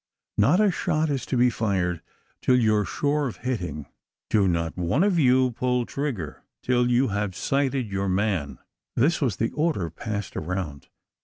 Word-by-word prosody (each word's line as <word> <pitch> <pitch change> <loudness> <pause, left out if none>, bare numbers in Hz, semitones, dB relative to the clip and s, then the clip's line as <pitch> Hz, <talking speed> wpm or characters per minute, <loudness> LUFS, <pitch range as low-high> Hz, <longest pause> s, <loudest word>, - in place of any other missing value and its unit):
"Not 140 - +5
a 210 -2 +4
shot 155 -2 0
is 135 -3 -2
to 130 - 0
be 125 0 +4
fired, 95 -7 -1 0.4
till 130 - +4
you 110 -4 +3
are 105 -1 +1
sure 145 0 0
of 120 - -6
hitting! 90 - -3 0.5
Do 100 -3 +4
not 85 -2 -1
one 90 - +1
of 195 -4 +2
you 130 -2 +4
pull 125 +1 0
trigger, 120 - -4 0.2
till 125 -1 +2
you 125 +1 +3
have 100 -2 -2
sighted 135 -1 0
your 100 0 -1
man!" 95 -8 0 0.4
This 150 +9 +2
was 125 -9 +1
the 115 +3 -1
order 150 - -1
passed 105 +1 -5
around. 80 -4 -4
115 Hz, 170 wpm, -25 LUFS, 95-135 Hz, 0.5 s, Not